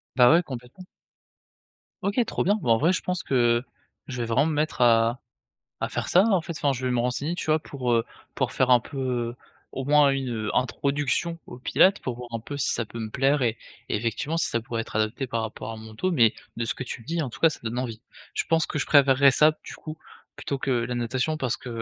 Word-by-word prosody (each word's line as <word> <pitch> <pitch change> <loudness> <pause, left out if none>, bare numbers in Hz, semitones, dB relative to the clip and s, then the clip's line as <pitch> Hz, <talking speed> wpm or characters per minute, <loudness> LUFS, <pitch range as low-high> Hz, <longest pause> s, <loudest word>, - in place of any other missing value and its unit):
Bah, 125 -2 +7
ouais, 170 +2 +5
complètement. 130 +5 -9 1.2
OK, 200 +3 -1
trop - - -1
bien. 205 +3 +3
Bah, 120 - -2
en 115 - +6
vrai, 165 +9 +3
je - - -1
pense 180 -1 -2
que 120 -3 +2 0.5
je 130 -3 -6
vais - - -1
vraiment 115 +5 +2
me 160 - 0
mettre 150 -2 -1
à 115 0 +4 0.6
à - - -1
faire - - -3
ça, 185 - +5
en 190 -3 +3
fait. 170 +1 -6
Enfin, 145 -1 +1
je 130 -1 -4
vais 125 - +1
me 120 - +1
renseigner, 125 +7 -1
tu - - -5
vois, 155 0 +3
pour, 130 -5 -3
heu, 115 -1 +2 0.3
pour - - -1
faire 130 - +2
un 125 -1 +7
peu, 125 -2 -3 0.4
au 135 - -3
moins 145 0 +5
une, 135 -2 -2
heu, 110 -3 -3
introduction 145 +6 0
au 125 - -10
Pilates 190 +9 +4
pour 125 - -4
voir 120 0 -9
un 115 - -3
peu 145 +6 -7
si 140 - 0
ça 115 - -1
peut 115 - -9
me 110 -1 -4
plaire 135 +5 +2
et 115 -2 +1 0.3
et - - +1
effectivement, 120 +9 -2
si 165 - +1
ça 115 - -1
pourrait 115 -1 -4
être 110 - -10
adapté 110 +5 -1
par 115 -2 -2
rapport 110 0 -5
à - - -6
mon 110 0 -11
dos. 185 +12 -1
Mais 115 -10 +4 0.2
de 115 - -2
ce 115 - -1
que - - -6
tu 115 - -7
dis, 165 +6 -2
en 140 - -3
tout - - -12
cas, 165 - +7
ça 155 - -7
donne 115 +1 -3
envie. 115 -3 -4 0.3
Je - - -1
pense 165 -1 +3
que 150 - -3
je - - -1
préférerais 140 -1 +6
ça, 155 +4 +5
du - - -8
coup, 155 0 -8 0.4
plutôt 140 - -3
que 135 0 -2
la 120 0 0
natation 125 +6 -1
parce 130 -5 -2
que, 125 - -9
130 Hz, 250 wpm, -25 LUFS, 115-150 Hz, 1.2 s, Bah